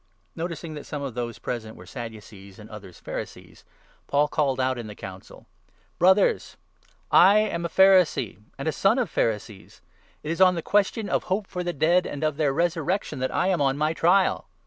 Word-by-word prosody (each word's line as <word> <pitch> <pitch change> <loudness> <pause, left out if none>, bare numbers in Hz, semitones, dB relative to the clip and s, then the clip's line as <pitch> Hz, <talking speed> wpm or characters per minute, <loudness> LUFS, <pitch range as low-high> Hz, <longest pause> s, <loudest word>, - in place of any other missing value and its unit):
Noticing 165 -1 -5
that 150 - -9
some 145 -2 -5
of 135 -3 -5
those 120 -1 -4
present 110 -3 -5
were 90 - -13
Sadducees 105 -3 -10
and 110 +1 -13
others 100 -5 -11
6 - - -20
Pharisees, - - -8 0.4
Paul 145 +1 +2
called 135 -4 0
out 130 -1 0
in 115 - -6
the 105 - -9
Council: 95 -2 -11 0.3
1 - - -37
" - - -39
Brothers, 190 +3 +3 0.5
I 195 +3 +7
am 205 -6 0
a - - -2
Pharisee 185 - +3 0.2
and 140 - -5
a - - +2
son 195 - +2
of 250 -4 -1
Pharisees. 105 -2 -3 0.4
It 150 - -3
is 170 - -2
on 185 -1 +6
the 165 - -4
question 205 +1 +1
of - - -1
hope 195 +3 -1
for 180 -1 -5
the 175 - -2
dead 170 +4 +2
and 145 +1 -6
of 155 -2 0
their 150 -3 +1
resurrection 170 +1 -1
that 130 - -1
I 185 - +1
am 180 -5 +1
on 135 0 +1
my 155 +2 0
trial." 180 +4 +2
155 Hz, 205 wpm, -25 LUFS, 120-180 Hz, 0.5 s, I